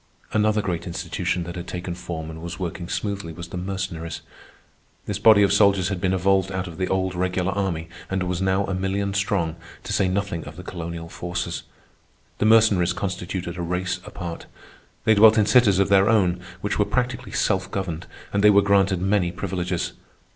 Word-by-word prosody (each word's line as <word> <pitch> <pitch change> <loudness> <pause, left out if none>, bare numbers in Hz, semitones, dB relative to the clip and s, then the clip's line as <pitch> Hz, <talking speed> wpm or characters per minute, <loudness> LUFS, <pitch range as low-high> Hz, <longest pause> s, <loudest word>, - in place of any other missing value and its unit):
Another 110 0 +2
great 90 -3 -3
institution 85 +1 -2
that 85 +1 -7
had 90 0 -6
taken 90 0 -4
form 80 -2 -6
and 80 0 -9
was 85 +1 -6
working 85 -1 -5
smoothly 100 -5 -3
was 85 +1 -8
the - - -7
Mercenaries. 90 -3 -4 0.8
This 100 -1 -3
body 105 -1 +7
of 100 - +3
soldiers 100 -3 +4
had 95 -3 -3
been 95 - +1
evolved 95 +1 +2
out 95 -1 -2
of 85 -1 -9
the 95 - 0
old 95 -1 0
regular 90 +1 0
army 90 -5 -2 0.2
and 95 -1 -1
was 90 0 -2
now 95 +1 +2
a 95 - -3
million 95 +1 -1
strong, 95 -5 0 0.3
to - - -4
say 95 - +2
nothing 95 -3 -2
of 75 - -9
the 90 - -9
colonial 85 -2 -6
forces. 85 0 -4 0.8
The - - +2
Mercenaries 105 -5 +5
constituted 90 -2 -4
a - - -3
race 90 +1 -2
apart. 85 -1 -7 0.6
They 110 - +6
dwelt 110 +1 +7
in 105 - +4
cities 110 -5 +5
of 100 0 +2
their 100 0 +5
own 95 -6 +3 0.2
which - - -2
were - - +4
practically 125 -1 -2
self 95 -3 +1
governed, 90 -4 -4 0.3
and 100 0 +1
they 105 - +8
were 100 0 +6
granted 100 -2 +3
many 95 -3 +2
privileges. 90 -2 -3
95 Hz, 190 wpm, -24 LUFS, 85-100 Hz, 0.8 s, they